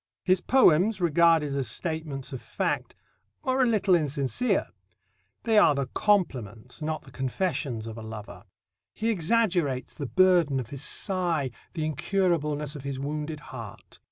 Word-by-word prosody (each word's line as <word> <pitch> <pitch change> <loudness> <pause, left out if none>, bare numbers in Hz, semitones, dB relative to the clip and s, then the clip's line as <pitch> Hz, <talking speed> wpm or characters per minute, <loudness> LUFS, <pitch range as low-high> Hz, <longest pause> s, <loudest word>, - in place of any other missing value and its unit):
His 185 -1 +3
poems, 210 -5 +4
regarded 165 -3 +3
as 135 -3 -1
statements 150 - -3
of 130 - -6
fact, - - -2 0.5
are 260 -2 +1
a 255 - +4
little 205 -4 +2
insincere. 150 - +1 0.7
They 220 -2 +4
are 155 -7 +5
the 140 -1 -1
compliments, 125 - 0
not 155 0 -3
the - - -15
confessions, 135 -4 -2
of 115 0 -7
a - - -7
lover. 110 -1 -9 0.5
He 225 +1 0
exaggerates 175 - +1
the 145 -4 -5
burden 175 -5 +3
of 120 -3 -6
his 140 -2 -4
sigh, 170 -6 0 0.2
the 160 - -2
incurableness 150 -2 0
of 145 - -7
his 140 0 -4
wounded 150 +2 -4
heart. 115 -5 -10
155 Hz, 145 wpm, -27 LUFS, 135-185 Hz, 0.7 s, are